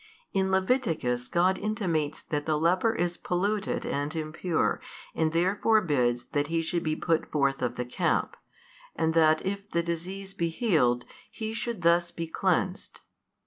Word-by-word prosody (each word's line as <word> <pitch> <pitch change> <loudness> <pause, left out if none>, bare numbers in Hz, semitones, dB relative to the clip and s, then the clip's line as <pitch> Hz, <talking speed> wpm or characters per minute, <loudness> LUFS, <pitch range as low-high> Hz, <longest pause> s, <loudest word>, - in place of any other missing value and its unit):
In 190 -1 +1
Leviticus 185 - +1
God 180 +5 +2
intimates 175 -8 -1
that 145 -1 -3
the 155 -1 +2
leper 185 +8 +2
is 175 0 -1
polluted 200 +3 -1
and 145 +2 -2
impure 160 +2 -1 0.3
and 160 -1 +1
therefore 190 +6 +3
bids 125 - +1
that 145 -1 0
he 165 +1 0
should 170 +1 -1
be 155 -1 -1
put 165 -1 0
forth 140 -2 +1
of 125 - -1
the 125 - -3
camp, 125 - 0 0.6
and 160 0 +1
that 155 -1 +4
if 200 +1 -3
the 170 - 0
disease 185 +4 -4
be 170 -2 -1
healed, 155 - +2 0.2
he 220 0 -5
should 225 -4 -3
thus 170 +1 +4
be 170 -1 -5
cleansed. 185 +3 -1
170 Hz, 155 wpm, -28 LUFS, 155-190 Hz, 0.6 s, that